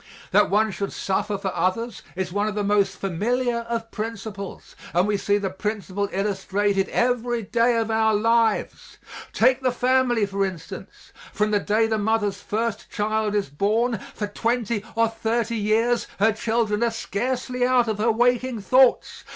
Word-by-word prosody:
That - - +4
one 215 +2 +2
should 200 +1 -4
suffer 200 +1 -1
for 195 -1 -3
others 230 +6 -1
is 180 -1 -3
one 205 +1 0
of 210 - -3
the 210 - -1
most 200 -2 +1
familiar 235 +6 -1
of 230 -1 -3
principles 215 -2 -6 0.2
and 180 +3 +3
we 210 - +1
see 200 +1 +1
the 195 -2 -2
principle 200 0 -3
illustrated 195 0 0
every 240 -1 0
day 235 +3 +2
of 225 -1 0
our 220 -1 +3
lives. 225 0 +1 0.3
Take 255 +3 +3
the 255 -1 +1
family, 250 -2 +2
for 195 0 -1
instance; 185 -4 -7 0.2
from 210 0 0
the 205 - +3
day 215 +2 +2
the 220 -1 0
mother's 210 -1 0
first 225 +1 -3
child 215 0 -1
is 205 -7 0
born, 215 - 0 0.2
for 210 - -2
twenty 225 0 -1
or 230 0 +3
thirty 225 +1 -1
years 225 +3 +1
her 220 +3 +4
children 220 0 0
are 235 - +3
scarcely 250 +3 -2
out 250 -1 +3
of 215 -2 -2
her 230 +2 +3
waking 245 +1 +1
thoughts. 255 +5 +3
220 Hz, 165 wpm, -24 LUFS, 205-235 Hz, 0.3 s, That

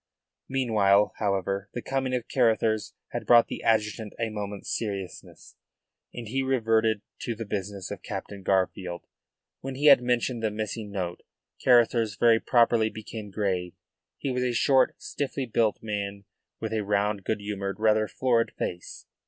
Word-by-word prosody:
Meanwhile, 105 -6 +3
however, 100 -1 -1
the 120 - -2
coming 130 -1 -1
of 120 -2 -3
Carruthers 110 -3 +1
had - - -5
brought 120 -1 +6
the - - -5
adjutant 110 -1 0
a 115 -1 0
moment's 105 -2 -4
seriousness, 100 -5 -6 0.6
and 120 -2 -7
he 135 +5 -1
reverted 115 -5 +1 0.2
to 115 - -3
the 115 +1 -6
business 100 -2 -4
of - - -6
Captain 100 -1 -6
Garfield. 95 -2 -1 0.5
When 135 0 -6
he 145 +3 -2
had 140 -3 +8
mentioned 125 -1 0
the 110 - +1
missing 105 0 -4
note, 90 -3 -4 0.4
Carruthers 115 -3 +4
very 115 +2 +4
properly 115 -2 +3
became 110 -1 -8
grave. 95 -3 -2 0.4
He 135 - -3
was 125 0 -1
a 125 -1 0
short, 130 +3 +3
stiffly 140 -1 -3
built 115 -2 0
man 100 -2 -4 0.4
with 110 0 -4
a 110 -1 0
round, 100 0 0
good 110 - -1
humoured, 100 -1 -4
rather 110 0 +3
florid 115 -2 +1
face. 90 0 -5
110 Hz, 155 wpm, -27 LUFS, 100-120 Hz, 0.6 s, had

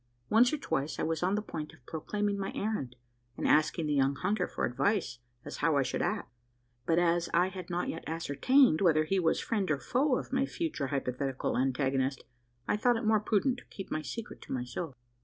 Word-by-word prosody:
Once 240 +3 +6
or 305 - 0
twice, 145 - -2
I - - -1
was 160 -1 -1
on 185 +3 +2
the 210 - -1
point 155 -7 -6
of 125 - -20
proclaiming 205 +5 -2
my 195 - -2
errand, 200 - -2 0.4
and - - -1
asking 155 +1 +3
the 150 - 0
young 135 0 +2
hunter 185 +4 0
for - - -2
advice 135 - 0 0.3
as - - -6
how 150 -1 +2
I 140 - +4
should - - -2
act; 120 - -2 0.5
but 165 - +3
as 170 0 +2
I 180 +2 +4
had 185 -2 -8
not 175 0 -1
yet 165 - -4
ascertained 165 - +3
whether 160 -5 +4
he 190 +5 +1
was 165 -2 +2
friend 205 -6 -1
or 155 - +2
foe 260 - +1
of - - -6
my 270 +1 +2
future 305 - -2
hypothetical 135 -1 -2
antagonist, 135 0 0 0.4
I - - +2
thought 240 +2 +3
it 225 - -4
more 215 0 +4
prudent 225 +5 +1
to - - -18
keep 195 - -9
my 155 - -1
secret 225 +9 -7
to - - -11
myself. 125 +4 -4
170 Hz, 210 wpm, -31 LUFS, 140-210 Hz, 0.5 s, Once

